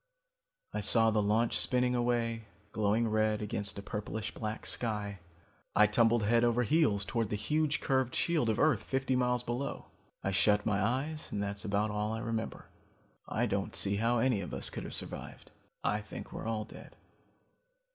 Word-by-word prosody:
"I - - -1
saw 115 -1 +4
the 105 -1 +2
launch 110 +3 +2
spinning 125 -1 +3
away, 120 -2 0 0.3
glowing 110 +2 +1
red 110 -1 +1
against 100 -1 -3
a 100 - -6
purplish 105 +1 -4
black 110 0 -5
sky. 105 -4 -2 0.6
I 105 - +7
tumbled 115 +1 +3
head 115 +3 +3
over 120 +1 +3
heels 120 -8 +2
towards 115 -3 -1
the - - -1
huge 150 +8 0
curved 130 -3 +1
shield 155 -9 +1
of 110 - +1
earth 150 -9 +3
fifty 135 +1 -1
miles 125 -1 +1
below. 125 +3 -4 0.3
I 95 - 0
shut 105 +2 +3
my 105 -2 +1
eyes 140 +7 -2
and - - -2
that's 100 0 -3
about 105 +1 0
all 105 +1 -1
I 110 - -3
remember. 115 -1 -3 0.6
I - - +1
don't - - -2
see 100 +1 +1
how 115 +3 +2
any 120 -3 +2
of 90 - -5
us - - -2
could - - -5
have - - -6
survived. - - -7 0.3
I 105 +1 +1
think 105 - -9
we're - - -5
all 110 -1 -2
dead. - - -13
110 Hz, 175 wpm, -32 LUFS, 105-125 Hz, 0.6 s, I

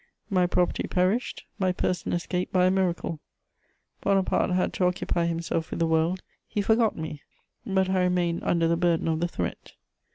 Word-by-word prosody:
My 180 -2 +3
property 180 0 0
perished; 190 +7 0
my 185 -1 +2
person 180 -1 -1
escaped 180 +1 -2
by 180 -1 +4
a 185 - +4
miracle: 180 -4 -1 0.8
Bonaparte 195 -1 +2
had 180 0 +1
to 185 - +1
occupy 180 -1 0
himself 165 -1 -2
with - - -4
the 165 - +3
world; 160 +3 +1 0.2
he - - -3
forgot 220 +2 +2
me, 155 -2 -5 0.5
but 190 -2 +2
I 190 0 +1
remained 180 -2 +1
under 165 -1 +2
the 170 - +2
burden 170 -2 +1
of 160 -1 +1
the 175 - +1
threat. 90 - -5
180 Hz, 170 wpm, -26 LUFS, 170-185 Hz, 0.8 s, by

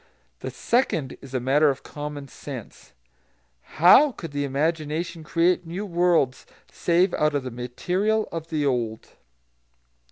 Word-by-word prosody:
The - - -5
second 200 - 0
is 135 -1 -9
a - - +2
matter 140 +5 +3
of 135 - -3
common 145 -1 -7
sense. 130 - -10 0.8
How 250 - +7
could 165 - -8
the 145 0 -2
imagination 160 +4 -2
create 170 +2 +1
new 185 +5 -4
worlds, 170 -8 +1 0.2
save 175 +2 +2
out 150 -1 +1
of 140 - 0
the 130 - -5
material 180 - -1
of 165 -1 -5
the 155 -3 -1
old? 120 -5 -2
155 Hz, 135 wpm, -24 LUFS, 135-175 Hz, 0.8 s, How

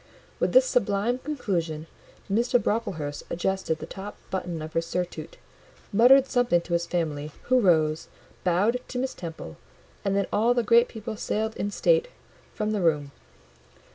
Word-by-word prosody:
With - - +1
this - - +7
sublime 245 - +1
conclusion, 175 - -3 0.4
Mr. 235 +5 +2
Brocklehurst 165 -12 -2
adjusted 185 -2 -1
the - - -7
top 200 +2 -8
button 180 -3 -3
of 155 - -8
his 165 0 -1
surtout, 175 -3 -4 0.6
muttered 255 +5 +7
something 245 -9 +2
to 170 - -6
his 170 0 +1
family, 155 -4 -2 0.2
who 255 0 +5
rose, 160 -6 +2 0.4
bowed 200 +8 +2
to 250 - -5
Miss 260 +1 -1
Temple, 160 - -8 0.5
and 195 -1 0
then 200 - +2
all 230 +4 +3
the 240 - +2
great 235 +2 +5
people 220 0 -6
sailed 220 +1 -2
in 205 - -2
state 485 - +2 0.5
from 215 -1 -1
the 210 -2 -1
room. 150 -4 +1
195 Hz, 155 wpm, -26 LUFS, 165-235 Hz, 0.6 s, this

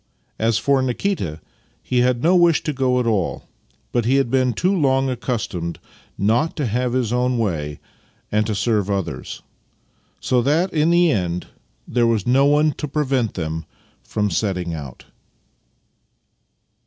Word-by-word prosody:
As 115 0 +2
for 140 -1 +2
Nikita, 125 - -2 0.4
he 125 - 0
had 125 0 +2
no 175 +3 +4
wish 170 -3 +4
to 150 - -2
go 130 -1 +1
at 125 - 0
all, 105 -7 0 0.5
but 120 - +1
he 130 +3 +3
had 135 -4 +1
been 130 -1 +2
too 180 - +1
long 135 -5 +2
accustomed 110 -9 -3 0.4
not 115 +11 +1
to 145 - -1
have 120 +2 -1
his 125 -3 0
own 125 0 +1
way 75 -10 -2 0.5
and 105 0 +1
to 110 - -1
serve 105 -1 0
others; 85 -9 -4 0.8
so 125 -1 +1
that 160 +9 +1
in 155 0 +2
the 170 -1 +4
end 90 -6 -1 0.4
there 120 -1 +2
was 110 -4 +1
no 135 +3 +4
one 150 +1 +3
to 150 - -2
prevent 135 -5 0
them 80 -2 -3 0.4
from 105 -2 -2
setting 90 -2 -1
out. 70 -6 -8
120 Hz, 155 wpm, -21 LUFS, 100-135 Hz, 0.8 s, no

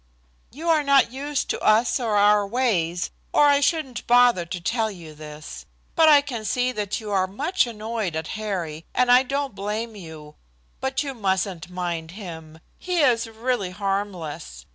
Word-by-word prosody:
"You 315 +6 -7
are 315 -2 +4
not 280 -4 +4
used 285 +2 -3
to - - -3
us 225 +5 +3
or 225 -4 -1
our 205 0 +4
ways, 190 -8 0 0.2
or 295 - +5
I 285 -1 +5
shouldn't 285 -4 -1
bother 240 -7 +5
to 180 +1 -4
tell 225 +5 0
you 170 -6 -10
this. 150 0 -10 0.3
But 320 -2 +6
I 290 -2 +7
can 245 -6 -6
see 250 +3 0
that 210 -4 -3
you 215 -2 -7
are 190 -2 +2
much 295 - 0
annoyed 220 -5 -4
at 160 0 -4
Harry, 180 -8 -4
and 250 0 +3
I 250 +1 +8
don't 275 -1 -2
blame 210 +3 -4
you. 160 -5 -10 0.5
But 265 +2 -1
you 275 -2 -4
mustn't 190 -6 -2
mind 175 -3 -4
him. 160 -6 -9 0.2
He 360 -2 0
is 240 -4 +3
really 225 -3 -2
harmless. 185 - -4
215 Hz, 170 wpm, -24 LUFS, 180-255 Hz, 0.5 s, I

